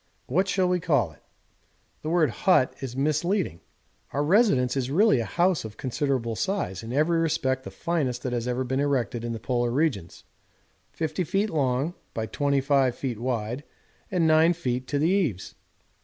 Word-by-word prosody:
What 190 +3 +1
shall 185 -1 +1
we 180 0 +1
call 145 - +1
it? 75 - -21 0.8
'The 155 - -4
word 165 -2 +3
"hut" 180 -9 +3
is 130 -2 -6
misleading. 155 - 0 0.5
Our 145 - +1
residence 145 - +3
is 130 -2 -1
really 185 - +4
a 115 - -1
house 175 - +1
of 110 -2 -9
considerable 130 -3 -1
size, 110 - -2
in 115 - -7
every 155 +5 +2
respect 130 -5 0
the - - -5
finest 140 -8 -2
that 125 - -2
has 120 0 -2
ever 125 +1 -1
been 130 +1 -1
erected 125 -5 0
in 120 - -3
the 115 - -4
Polar 120 0 0
regions; 125 - -1 0.7
50 160 +2 -2
ft. 195 +6 0
long 140 +1 0 0.2
by 110 - -1
25 135 -3 0
wide 120 +1 -2 0.5
and 180 -3 +1
9 160 +2 +5
ft. 130 -6 -3
to 145 - -1
the 150 +3 +2
eaves. 170 - 0
140 Hz, 170 wpm, -26 LUFS, 125-165 Hz, 0.8 s, 9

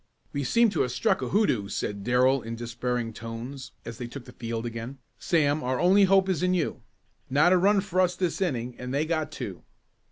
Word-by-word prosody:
"We 140 - -1
seem 230 - +3
to 175 - 0
have 125 - 0
struck 125 - +1
a 130 - -2
hoodoo," 175 - +2
said 100 0 -3
Darrell 125 +3 +3
in 115 0 -5
despairing 120 0 -3
tones 115 +5 -7
as 115 -1 -7
they 120 - -4
took 125 +1 -9
the 125 - -11
field 115 -1 -4
again. 115 +3 -6 0.2
"Sam, 155 -3 +1
our 125 0 -1
only 195 +3 +5
hope 195 0 +4
is 185 -5 0
in 180 0 +2
you. 170 -4 -1 0.5
Not 150 +7 +4
a - - +5
run 200 +2 +4
for 185 -1 0
us 180 -1 +2
this 180 0 -2
inning 125 -9 -1
and 125 0 -5
they 140 +3 +1
got 155 -1 -1
two." 95 - -6
135 Hz, 215 wpm, -27 LUFS, 120-180 Hz, 0.5 s, only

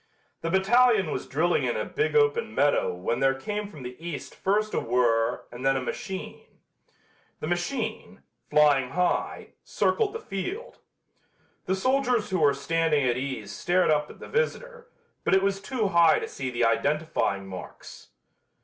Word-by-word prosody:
The 165 - -2
battalion 200 0 +4
was - - -4
drilling 170 +5 +1
in - - 0
a - - -2
big 435 +1 -1
open 450 +1 +2
meadow - - +2
when 120 - -2
there 135 0 +3
came 210 +10 -4
from 150 -10 -11
the 125 0 -7
East 170 -4 -6
first 210 +2 0
a - - +1
whirr 115 -1 +1
and 120 +2 -9
then 135 0 +3
a - - -2
machine. 190 +8 -7 0.8
The - - -4
machine, 175 - -3 0.3
flying 145 -4 +4
high, 180 +1 -1
circled 435 -3 0
the 455 - -4
field. 415 - -6 0.9
The 190 - +1
soldiers 250 0 +1
who 185 - +1
were 145 -3 +4
standing 150 0 +1
at 120 -1 +2
ease 125 -6 -4
stared 175 - +1
up 150 -1 +1
at - - -12
the - - -9
visitor, 480 0 -2 0.3
but - - +3
it 190 - +3
was 195 0 0
too 220 -1 -1
high 170 -3 +5
to - - -3
see 130 -1 -5
the 120 -1 +1
identifying 140 -4 0
marks. 95 -1 -10
170 Hz, 165 wpm, -26 LUFS, 135-215 Hz, 0.9 s, high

